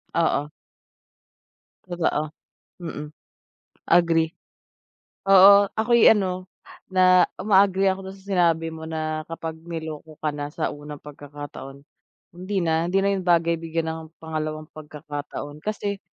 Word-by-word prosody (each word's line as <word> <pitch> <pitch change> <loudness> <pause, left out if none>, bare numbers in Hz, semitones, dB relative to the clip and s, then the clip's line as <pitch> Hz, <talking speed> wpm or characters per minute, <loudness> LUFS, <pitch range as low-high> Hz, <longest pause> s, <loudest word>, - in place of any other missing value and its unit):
Oo. 150 -3 +1 1.4
Totoo, 160 -3 -1 0.5
mm. 150 -3 -6 0.8
Agree. 165 -2 +4 1.0
Oo, 200 +1 +8
ako'y 235 +1 +5
ano 185 -3 -1 0.4
na 185 -1 +6 0.2
uma-agree 195 -1 +3
ako 190 0 -6
doon 195 - -13
sa 195 +1 -20
sinabi 165 -3 +2
mo 160 0 -9
na 155 -1 -2
kapag 165 -1 -5
niloko 160 -2 -7
ka 155 - -1
na 145 0 -4
sa 160 0 -2
unang 145 0 -9
pagkakataon, 145 -1 -10 0.5
hindi 185 +3 -4
na, 160 +1 +1
hindi 195 +2 +2
na 200 - +2
'yun 190 - -2
bagay 170 -1 +3
bigyan 165 0 -2
ng 160 0 -5 0.2
pangalawang 155 -1 -4
pagkakataon, 150 -1 -8
kasi 205 -2 -3
165 Hz, 125 wpm, -24 LUFS, 155-185 Hz, 1.4 s, Oo